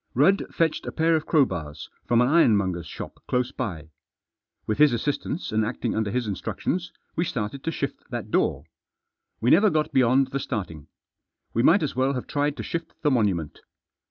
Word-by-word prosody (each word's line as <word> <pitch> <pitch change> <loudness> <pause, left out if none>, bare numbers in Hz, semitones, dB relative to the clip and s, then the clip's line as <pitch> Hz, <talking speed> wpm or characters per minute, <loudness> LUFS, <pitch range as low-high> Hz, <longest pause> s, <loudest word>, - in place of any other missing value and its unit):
Rudd 185 +10 +3
fetched 165 -2 0
a - - -2
pair 165 0 +2
of 155 -1 -2
crowbars 85 - 0 0.2
from 120 0 +4
an 125 - +4
iron 140 -8 +5
monger's 90 -4 -2
shop - - -8
close 125 0 0
by. 80 -10 -5 0.7
With 110 - -2
his 150 -4 +6
assistance, 145 +6 -2
and 110 0 +2
acting 115 +3 -2
under 110 -2 0
his 125 +2 -1
instructions, 170 - -3 0.2
we 170 - +1
started 125 -3 -4
to 165 - -1
shift - - -5
that - - -5
door. - - +1 0.8
We 120 - +3
never 205 +6 +6
got 155 -3 0
beyond 130 +1 +4
the 140 - -1
starting. 90 - -5 0.7
We 115 - +2
might 165 +8 +5
as 145 - -2
well 130 +2 +1
have 125 - -4
tried 145 0 -1
to - - -4
shift 165 0 -5
the 150 - +3
monument. 100 - 0
125 Hz, 185 wpm, -25 LUFS, 105-150 Hz, 0.8 s, his